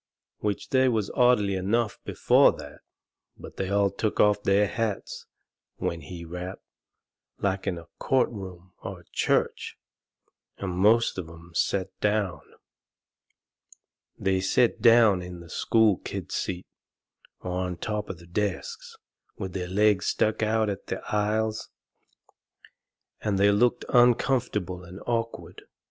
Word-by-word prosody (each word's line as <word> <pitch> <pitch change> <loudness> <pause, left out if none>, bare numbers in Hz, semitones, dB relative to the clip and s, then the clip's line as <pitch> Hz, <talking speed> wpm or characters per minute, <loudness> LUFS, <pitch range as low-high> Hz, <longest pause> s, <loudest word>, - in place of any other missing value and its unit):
Which 105 -2 -3
they 130 -1 +4
was 110 -5 -1
orderly 120 -5 +3
enough 105 +4 0
before - - +4
that, - - -11 0.6
but - - -12
they 95 - -2
all 100 0 +2
took 105 +2 -2
off 105 -1 +4
their 100 +1 +3
hats 110 -1 -3 0.5
when 85 -1 -3
he 85 +4 -8
rapped, 90 +3 -7 0.7
like 95 0 -1
in 90 -3 -1
a 85 - -10
court 130 -2 +2
room 95 -4 -9
or - - -7
a - - -25
church, - - 0 0.8
and 95 -2 -4
most 105 +4 +3
of 85 -3 -6
'em 85 +1 -14
set 95 +2 0
down. 105 -4 0 1.8
They 95 -1 +1
set 115 +5 +2
down 115 -5 +6
in 90 0 -8
the 85 -2 -12
school 110 -4 +3
kids' - - -6
seats, 90 -1 -3 0.7
or 90 - -5
on 90 -2 -3
top 105 +3 -3
of 95 - -5
the 85 - -15
desks, 450 - -3 0.4
and 95 -3 -5
their 90 -2 -3
legs 100 0 +2
stuck 110 +1 +1
out 110 0 +2
into 100 -2 -3
the - - -5
aisles, 110 +1 0 1.5
and 105 -2 0
they 100 +1 +5
looked 120 +4 +2
uncomfortable 120 -7 +2
and 90 +2 -10
awkward. 115 -1 -3
100 Hz, 135 wpm, -26 LUFS, 90-110 Hz, 1.8 s, down